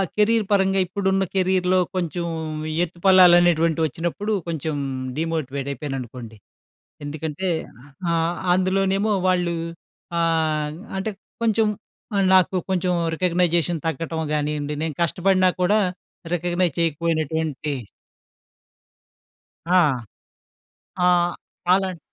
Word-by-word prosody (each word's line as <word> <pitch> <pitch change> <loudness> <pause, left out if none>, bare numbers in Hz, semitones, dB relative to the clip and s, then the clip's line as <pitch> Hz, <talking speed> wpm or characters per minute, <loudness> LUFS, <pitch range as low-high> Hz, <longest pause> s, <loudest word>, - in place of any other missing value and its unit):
Career 215 +1 +3
పరంగా 195 -1 +3
ఇప్పుడున్న 190 +1 0
కెరియర్‌లో 185 -1 +2 0.2
కొంచెం 175 -1 -2 0.6
ఎత్తుపల్లాలనేటువంటివచ్చినప్పుడు 175 0 +3 0.2
కొంచెం 160 -2 -3 0.4
డీమోటివేట్ 155 -4 -2
అయిపోయాననుకోండి. 125 -5 -6 0.7
ఎందుకంటే 155 +4 -4 0.6
ఆహ్, 165 +1 +1 0.2
అందులోనేమో 195 +3 +1
వాళ్ళూ 175 -2 +1 0.6
ఆహ్, 155 -2 0 0.2
అంటే 205 +3 -2 0.3
కొంచెం 225 -1 +3 0.7
నాకు 185 0 +4
కొంచెం 180 -1 +1 0.2
రికగ్నైజేషన్ 175 -2 +1
తగ్గటం 160 +1 -2
గానియ్యండి 150 0 -1
నేను 160 -2 -2
కష్టపడినా 185 +2 +3
కూడా 205 +4 +4 0.6
రికగ్నైజ్ 175 -1 0
చేయకపోయినటువంటి 160 -2 -1 2.0
ఆ! 185 - +6 1.3
ఆ! - - +6 0.6
ఆలన్ 190 -2 0
170 Hz, 80 wpm, -23 LUFS, 155-185 Hz, 2.0 s, ఆ